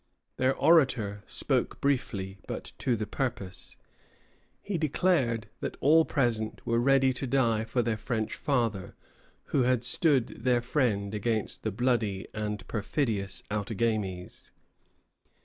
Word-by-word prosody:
Their 130 +1 +2
orator 125 -11 +3
spoke - - 0
briefly, 100 -8 -1
but - - -5
to 125 - +1
the 110 -1 -3
purpose. 105 -8 -4 0.8
He 200 -4 -3
declared 140 -8 +1
that - - -4
all 160 +3 +5
present 115 -5 0
were 115 0 +2
ready 135 +1 +4
to 135 +1 -3
die 115 -4 +2
for 120 +1 0
their 115 -1 0
French 110 -1 -2
father, 115 -9 -1 0.6
who 140 - +4
had 125 -1 +2
stood 130 -2 +1
their 125 -1 +3
friend 115 -6 0
against 110 0 -1
the 110 - -2
bloody 110 -3 0
and 105 -1 -4
perfidious 105 -4 -1
Outagamies. 105 -3 -2
115 Hz, 125 wpm, -29 LUFS, 105-130 Hz, 0.8 s, all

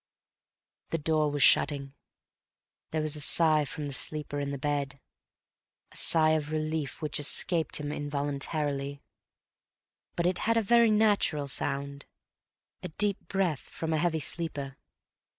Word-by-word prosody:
The 165 - -1
door 155 -1 +1
was 145 -1 +1
shutting. 140 -2 +3 1.0
There 155 -1 -1
was 155 0 +1
a 150 - -6
sigh 155 0 +4
from 150 +1 -6
the 140 - -5
sleeper 150 +1 -1
in 140 -1 -2
the 140 - -3
bed, 140 0 -2 0.9
a - - -18
sigh 155 -1 +3
of 155 -2 0
relief 155 -1 -3
which 150 0 0
escaped 160 +3 +1
him 145 -1 -4
involuntarily. 145 -1 -3 1.1
But 170 - -1
it 180 0 +1
had 230 +1 +1
a - - +4
very 235 +2 +5
natural 205 -9 +2
sound—a 140 +5 -6
deep 200 +4 -1
breath 185 -8 0
from 160 -1 -5
a - - +2
heavy 160 -1 0
sleeper. 145 -4 -2
150 Hz, 135 wpm, -29 LUFS, 140-165 Hz, 1.1 s, very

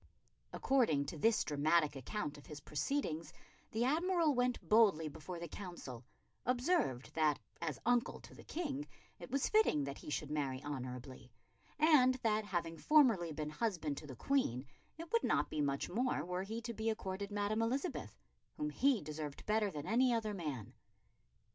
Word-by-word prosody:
According 225 - +2
to 160 - -6
this 225 +6 +4
dramatic 150 +1 +2
account 145 - -4
of - - -16
his 150 -1 -8
proceedings, 165 - -2 0.4
the 225 +2 0
Admiral 330 +2 +3
went 250 -1 0
boldly 205 -8 +5
before 160 +4 -7
the 170 0 -5
Council; 160 - -8 0.4
observed 250 - +1
that, 155 -2 +3 0.2
as 160 -3 -2
uncle 245 0 +2
to - - -13
the - - -13
King, 295 -3 -3 0.3
it - - -9
was 275 0 +1
fitting 430 - +4
that 140 0 -5
he - - -9
should 150 0 -3
marry 140 -4 -1
honourably; 130 -2 -6 0.5
and 295 -5 +6
that, 215 -1 +2
having 170 -4 -2
formerly 230 - +5
been 150 0 -4
husband 165 -6 -1
to 150 - -7
the 130 - -8
Queen, 140 - 0 0.3
it 330 +1 -8
would 465 - +3
not - - +1
be 150 - 0
much 140 -1 0
more 230 - 0
were 180 +1 -2
he 220 +4 -5
to 235 0 -4
be 220 +1 -1
accorded 200 -2 -3
Madam 205 +1 0
Elizabeth, 265 +9 -2 0.4
whom 300 0 -2
he 270 - +2
deserved 150 -1 -6
better 210 -1 +2
than 150 -5 -6
any 245 +6 +3
other 220 -3 0
man. 150 - -5
195 Hz, 165 wpm, -36 LUFS, 150-250 Hz, 0.5 s, and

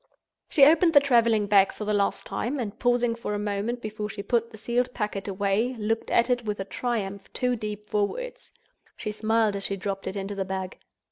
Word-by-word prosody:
She 275 - +7
opened 325 +2 +5
her - - +11
traveling 230 -6 +3
bag 200 -1 +5
for 210 - -6
the 210 - 0
last 200 -1 0
time, 265 +5 -2
and 215 -4 -4
pausing 245 -1 +2
for 230 -3 -4
a - - -1
moment 210 +4 -2
before 215 -1 -4
she 200 0 -6
put 230 +2 +1
the 220 - -12
sealed 240 +3 0
packet 210 -3 -3
away, 200 +5 0
looked 225 +1 -1
at 235 - +3
it 245 -1 +1
with 210 -2 -3
a 195 - -3
triumph 200 -3 -3
too 250 -1 0
deep 210 -2 -5
for 210 -1 +1
words. - - -7 0.5
She 215 - -3
smiled 220 0 +1
as 195 - -3
she 195 - -1
dropped 195 0 -4
it 190 - -3
into 195 0 -4
the 195 -1 -2
bag. 190 0 -5
215 Hz, 215 wpm, -26 LUFS, 200-240 Hz, 0.5 s, her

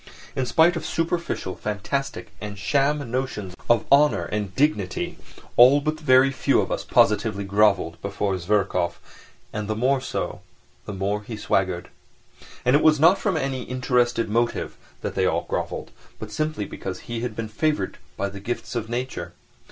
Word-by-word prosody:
In 130 -1 -1
spite 165 +6 +4
of 165 - -3
superficial, 165 - -2
fantastic 105 +7 -3
and 105 -1 -6
sham 140 +4 +1
notions 120 -7 -3 0.2
of 120 -1 +4
honour 140 - +5
and 100 -2 -3
dignity, 105 -10 0 0.4
all 130 +4 +8
but 155 +2 -2
very 130 -2 +5
few 135 - +2
of - - -1
us - - -1
positively 105 -1 +2
grovelled 100 -3 +2
before 100 0 -1
Zverkov, 90 -2 0 0.5
and 105 -1 -3
the 110 - -1
more 130 +4 +2
so - - -4 0.4
the - - -5
more 100 +2 -1
he 110 +1 -7
swaggered. 95 -4 0 0.8
And 125 +2 +5
it 145 - +4
was 155 -2 +5
not 170 +6 +6
from 200 -3 0
any 135 -1 -2
interested 125 -2 +1
motive 120 +3 0 0.3
that - - -3
they - - +1
grovelled, - - -2 0.3
but - - -8
simply 155 -8 -2
because 95 -1 -6
he 120 -1 -5
had 120 -2 -4
been 115 0 -3
favoured 150 +8 -1 0.2
by 100 - 0
the 100 0 -9
gifts 120 +5 -4
of 115 -2 -3
nature. 125 +2 -4
120 Hz, 160 wpm, -24 LUFS, 100-140 Hz, 0.8 s, all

